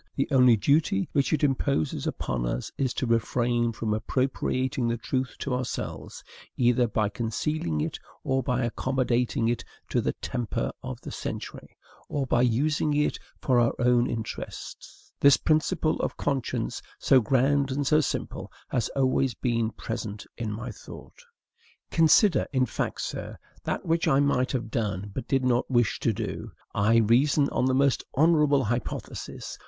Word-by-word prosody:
The 135 - 0
only 125 -4 +6
duty 160 - +2
which 140 -2 +1
it 155 -2 +1
imposes 135 - 0
upon - - -2
us - - -3
is 130 -2 0
to - - -1
refrain 120 0 +1
from 110 -1 -2
appropriating 130 +2 -1
the 115 0 0
truth 130 +2 -2
to 140 - -3
ourselves, 125 -1 -4 0.3
either 120 0 +3
by 110 -1 0
concealing 110 - -2
it, - - -3 0.2
or 135 0 +1
by 125 0 0
accommodating 125 -1 0
it 120 0 -1 0.3
to - - +1
the - - -1
temper 120 -4 -3
of - - -6
the - - -8
century, - - -7 0.3
or 140 -2 -1
by 120 -1 +2
using 145 +5 +1
it 150 0 +1 0.2
for 125 -2 +3
our 120 -1 +2
own 120 0 +3
interests. 115 -2 -7
This 140 -3 +7
principle 155 0 +1
of - - -2
conscience, 135 -3 -2 0.2
so 130 -2 +4
grand 135 +4 +2
and 140 +2 -1
so 155 +2 +4
simple, - - -4 0.2
has 115 - 0
always 130 -2 +2
been 115 -2 0
present 110 -2 -6
in 115 -3 -3
my 115 +4 -5
thought. 110 - -12 0.7
Consider, 165 - +4
in 130 -2 +2
fact, - - -3
sir, - - -5 0.3
that - - -2
which 165 +1 +1
I 140 -3 +4
might 135 -3 +2
have 115 -4 -3
done, 100 -3 -2
but 115 - -5
did 135 -1 +1
not 125 0 +1
wish 120 -4 +2
to - - +1
do. - - -5 0.2
I 105 +3 +3
reason 130 +6 +4
on - - 0
the 130 0 +2
most 140 0 +2
honorable 150 -2 +4
hypothesis. 120 +1 -4
125 Hz, 160 wpm, -27 LUFS, 115-140 Hz, 0.7 s, This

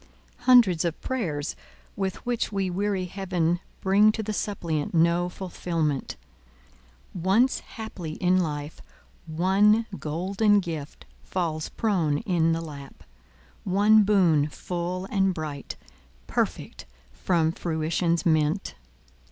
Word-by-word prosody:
Hundreds 230 -10 +6
of 170 -2 -2
the - - -9
prayers 165 - -2 0.4
with 190 -2 -3
which 240 -2 -1
we 195 -2 -1
weary 195 0 -1
Heaven 175 -2 -1 0.2
bring 205 +3 +5
to 220 - -3
the 215 +1 -3
suppliant 170 -8 -2
no 170 +2 +3
fulfilment. 165 -6 -3 1.0
Once 195 +9 +2
haply 190 -8 -7
in 180 +2 +2
life, 150 -2 -4 0.5
one 195 +7 +3
golden 195 +7 +1
gift 160 -6 -6 0.2
falls 160 -4 -2
prone 175 -10 0
in 170 -6 +1
the 165 0 0
lap—one 140 - -1
boon 175 -8 +3
full 180 +3 -4
and 195 -2 +2
bright, 150 -3 -5 0.5
perfect - - -3 0.2
from 160 - +1
Fruition's 165 +1 -1
mint. 155 +3 +1
175 Hz, 110 wpm, -26 LUFS, 155-195 Hz, 1.0 s, Hundreds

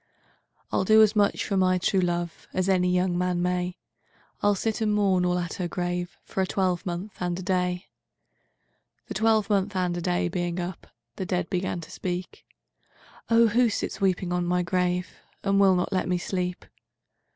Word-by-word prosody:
II'I'll - - +2
do 220 +3 +7
as 215 0 +3
much 205 -1 +2
for 200 - -1
my 185 -1 +3
true 185 +1 +1
loveAs 175 +1 -2
any 180 -2 +3
young 180 0 +1
man 180 0 0
may; 180 0 -1 0.6
I'll 205 0 +3
sit 220 +3 -2
and 215 -1 +2
mourn 195 -3 +3
all 180 0 +1
at 175 -1 -3
her 175 - 0
graveFor 175 +1 -3
a 190 - +1
twelvemonth 185 +1 -1
and 175 -1 -1
a 185 - -6
day.'IIIThe 180 -1 -6
twelvemonth 210 -3 +2
and 180 -2 0
a 175 - -3
day 90 - 0
being 175 - -2
up, 175 0 -5 0.3
The 185 - -3
dead 180 -1 -1
began 180 -1 -1
to - - -11
speak:'Oh 190 +5 -3
who 240 +2 +3
sits 205 - -3
weeping 185 -2 +1
on 180 0 0
my 180 +1 +1
grave, 180 0 -1 0.3
And 195 0 +2
will 195 -2 +6
not 180 +2 -1
let 185 - 0
me 180 - +2
sleep? 180 0 -3
180 Hz, 165 wpm, -26 LUFS, 180-195 Hz, 0.6 s, do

